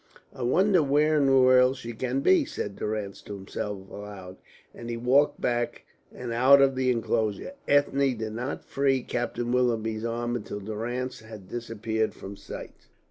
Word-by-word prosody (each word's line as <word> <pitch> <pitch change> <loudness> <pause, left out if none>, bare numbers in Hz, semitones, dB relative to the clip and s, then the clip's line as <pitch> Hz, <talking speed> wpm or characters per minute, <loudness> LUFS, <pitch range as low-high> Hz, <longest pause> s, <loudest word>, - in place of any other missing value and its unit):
"I - - -9
wonder 185 +9 +3
where 150 +2 +3
in 140 -2 +3
the 135 0 +5
world 130 0 +5
she 120 -1 -7
can 130 +4 -2
be," 345 - +5
said 105 - -5
Durrance 105 -2 -4
to 105 - -8
himself 95 0 -6
aloud, 95 -3 -9 0.4
and 120 - -8
he 120 - -3
walked 130 +5 +3
back 120 0 -1 0.3
and 120 -2 -6
out 130 +4 +6
of 135 -1 +4
the 130 0 0
enclosure. 115 - -1 0.2
Ethne 140 -2 +2
did 110 -1 -4
not 125 +5 -4
free 135 -2 +1
Captain 120 0 -2
Willoughby's 115 -3 0
arm 120 +1 -2
until 105 -3 -5
Durrance 115 +5 -4
had 110 -4 -11
disappeared 110 -2 -2
from 100 +1 -8
sight. - - -10
120 Hz, 165 wpm, -27 LUFS, 110-130 Hz, 0.4 s, out